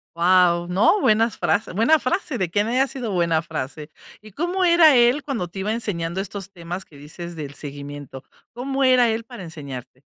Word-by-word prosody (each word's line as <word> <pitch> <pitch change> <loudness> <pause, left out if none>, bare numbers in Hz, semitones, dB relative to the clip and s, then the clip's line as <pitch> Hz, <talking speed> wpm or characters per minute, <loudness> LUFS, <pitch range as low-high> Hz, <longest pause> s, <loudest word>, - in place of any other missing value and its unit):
Guau, 175 0 +3
no, 195 - +3
buenas 225 +1 +2
frases 210 - 0
buena 230 +11 +4
frase, 305 -1 -2
de 185 -5 -2
quién 205 +3 +1
haya 255 +3 +2
sido 255 -5 -5
buena 170 -3 +1
frase, 150 -1 -6 0.3
¿y 215 0 -14
cómo 350 - -1
era 340 -4 +6
él 245 +4 +4
cuando 240 -11 -3
te 175 - -13
iba 205 +3 -1
enseñando 190 -6 -3
estos 200 0 -7
temas 175 0 -7
que 145 - -17
dices 170 +4 -9
del 145 -3 -7
seguimiento?, 145 -2 -8 0.3
¿cómo 270 +3 -2
era 255 -2 +5
él 225 +1 -2
para 235 -2 -11
enseñarte? 140 -6 -9
190 Hz, 185 wpm, -22 LUFS, 165-245 Hz, 0.3 s, era